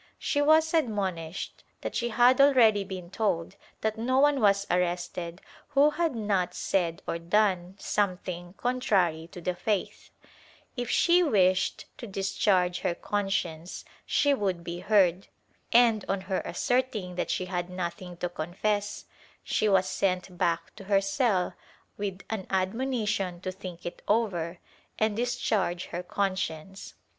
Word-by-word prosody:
She 290 - 0
was 315 +2 +4
admonished 190 - -2 0.2
that - - -4
she 240 -1 0
had 245 +4 +5
already 235 -7 +5
been 185 -3 -8
told 195 -4 -1 0.3
that 220 0 -1
no 255 +3 +1
one 285 -1 +4
was 200 -1 +4
arrested 175 0 -1 0.3
who 290 +1 +4
had 320 -3 0
not 195 -5 0
said 170 -3 -1
or 170 - -2
done 185 0 +1
something 180 -3 -2
contrary 190 -10 0
to - - -9
the 180 +1 -1
faith; 190 +2 -2 0.7
if 245 -3 -3
she 350 +5 +4
wished 190 - +2
to 240 - -6
discharge 190 -2 +1
her 170 - -1
conscience 185 -5 -2 0.2
she 285 -1 +2
would 190 -8 -1
be 170 0 -5
heard, 190 -2 +3 0.4
and, 230 -3 +5
on 195 -1 0
her 190 0 -2
asserting 245 -7 -1
that 180 - -3
she 185 - -1
had 180 -1 -3
nothing 180 0 -5
to 180 - -2
confess, 205 +5 -2 0.4
she 215 - +1
was 190 -1 +3
sent 185 -1 -1
back 170 -1 -1
to 195 - -10
her 200 0 +4
cell 195 -2 +1 0.4
with 195 -2 -4
an 210 -4 -3
admonition 200 -2 -1
to 185 - -3
think 180 -2 -9
it 175 - -6
over 180 -6 0 0.4
and 220 -1 +1
dis 245 +2 0
charge 190 -7 0
her 175 - -2
conscience. 190 -1 -3
195 Hz, 145 wpm, -28 LUFS, 180-220 Hz, 0.7 s, had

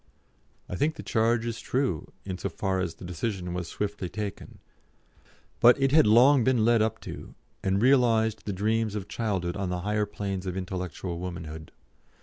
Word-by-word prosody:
I - - -5
think 155 - +1
the - - -8
charge 115 +1 +1
is 115 -1 -3
true, 125 - -1
in 95 -2 -5
so 100 - -2
far 95 +2 -1
as 90 -3 -2
the - - -10
decision 90 0 -3
was 90 -2 -3
swiftly 105 -2 -3
taken; 105 -1 -6 1.0
but 120 +3 +7
it 135 -1 +2
had 155 +2 +6
been 105 - +4
long 130 +2 +6
led 115 -2 +3
up 110 0 0
to, - - -9 0.3
and 95 0 +1
realised 115 -5 +3
the 105 - -2
dreams 110 +2 0
of 100 -2 -4
childhood 95 -6 -2
on 100 -2 -2
the 90 0 -2
higher 105 +2 0
planes 100 -2 -4
of 90 0 -3
intellectual 90 -2 -4
womanhood. 80 -4 -7
105 Hz, 175 wpm, -27 LUFS, 90-115 Hz, 1.0 s, but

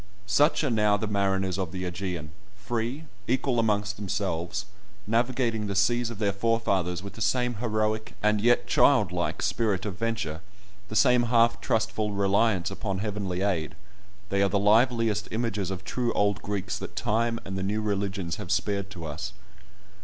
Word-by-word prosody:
Such 145 +11 +3
are 140 - +1
now 105 -2 +3
the 110 - -2
mariners 95 -2 0
of 90 -4 -2
the 90 0 -4
Ægean: 90 -3 -4 0.3
free, 115 +8 -3 0.2
equal 125 0 +1
amongst 105 -2 +1
themselves, 95 -4 -2 0.4
navigating 115 -1 0
the 100 - -3
seas 120 +5 +2
of 115 - -7
their 100 -2 0
forefathers 100 -5 0
with 100 - -7
the 110 - -10
same 125 +2 +1
heroic, 110 -1 -1
and 105 -1 +3
yet 120 +2 +3
child 110 -10 +4
like, 90 -1 -2
spirit 105 -5 0
of 95 -4 -5
venture, 105 -9 -2 0.5
the 110 - -6
same 120 +3 +5
half 115 0 +3
trustful 110 -2 0
reliance 100 -1 +2
upon 95 0 -3
heavenly 100 -3 -3
aid, 90 -6 -1 0.5
they 100 0 +1
are 100 - +3
the 100 - +1
liveliest 110 0 +3
images 110 -5 -2
of 95 -1 -5
true 120 +2 -1
old 100 0 +1
Greeks 100 -2 -3
that - - -7
time 115 +2 0
and 95 - -5
the 95 - -2
new 100 +3 -1
religions 100 -4 -2
have 85 - -5
spared 100 0 0
to 90 -4 -8
us. 75 +1 -5
105 Hz, 170 wpm, -27 LUFS, 95-115 Hz, 0.5 s, same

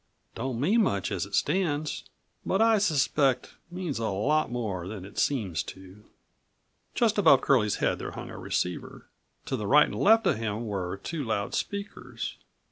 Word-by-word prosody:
Don't 120 0 -3
mean 205 - +3
much 100 - 0
as 95 -1 -2
it 100 - -3
stands, 155 -5 0 0.3
but 190 - 0
I 225 -1 +5
suspect 140 - +1 0.2
means 175 -7 -4
a 115 - -1
lot 140 +11 +1
more 100 -8 -3
than 100 -2 -7
it 100 - -7
seems 100 - 0
to." 95 +2 -15 0.9
Just 220 -3 +2
above 155 -9 +6
Curlie's 110 -7 +3
head - - 0
there - - -4
hung - - -7
a - - -8
receiver. 90 0 -3 0.4
To - - -2
the 105 -5 -3
right 150 +5 +7
and - - -7
left 225 +2 +4
of - - +2
him 110 +1 -3
were 95 -3 -3
two 155 +8 -4
loud 110 -4 -2
speakers. 200 0 -4
125 Hz, 170 wpm, -28 LUFS, 100-165 Hz, 0.9 s, right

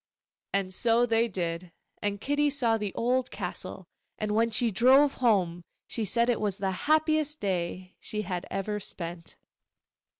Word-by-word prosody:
And 195 -1 -1
so 235 +4 +3
they 230 0 +2
did; 175 -3 -4 0.3
and 205 -1 -1
Kitty 290 +5 +1
saw 250 -5 +2
the 210 -3 -3
old 250 +2 +1
castle, - - -5 0.3
and 215 -1 -2
when 230 +2 +3
she 230 +1 +2
drove 265 +7 +5
home 180 -8 +2 0.2
she 225 - -3
said 235 +4 +2
it 240 -3 +1
was 205 -3 0
the 195 -2 -1 0.2
happiest 310 -1 +2
day 185 -1 -3
she 215 0 -4
had 180 -1 -4
ever 210 +2 -2
spent. 170 -3 -6
215 Hz, 155 wpm, -28 LUFS, 185-245 Hz, 0.3 s, drove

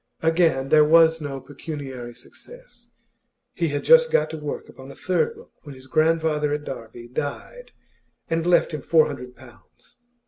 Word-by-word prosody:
Again 160 -5 +2
there 155 0 +6
was 160 +1 +5
no 140 -2 -5
pecuniary 135 -4 -8
success. - - -15 0.6
He 170 - -1
had 145 -1 -3
just 485 0 +6
got 485 - +1
to 160 - -5
work 150 -1 -6
upon 130 +1 -13
a - - -11
third 185 - -1
book, 460 +2 -16
when 145 -3 -11
his 130 0 -14
grandfather 155 0 +1
at 150 0 -3
Derby 120 -3 -9
died 145 - -6 0.6
and 165 0 -1
left 175 -1 +3
him 150 - -4
four 160 +1 +4
hundred 125 -4 -8
pounds. 120 -2 -19
150 Hz, 165 wpm, -23 LUFS, 135-165 Hz, 0.6 s, there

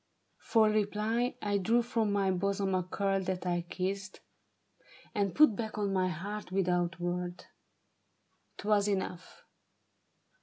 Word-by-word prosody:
For 220 -2 +3
reply 215 +3 0
I 205 -1 +1
drew 230 +5 +2
from 225 -3 0
my 200 -1 +2
bosom 195 +1 0
a 185 - +2
curl 195 +2 -1
that 185 -1 -3
I 175 -1 +1
kissed. 190 +1 -3 0.9
And 200 -4 0
put 300 -8 +6
back 220 0 -4
on 200 -2 0
my 185 -1 +2
heart 190 +4 -5
without 175 -2 0
word. 175 0 -3 1.1
'Twas 205 0 +2
enough. 190 -3 -3
195 Hz, 125 wpm, -31 LUFS, 185-210 Hz, 1.1 s, put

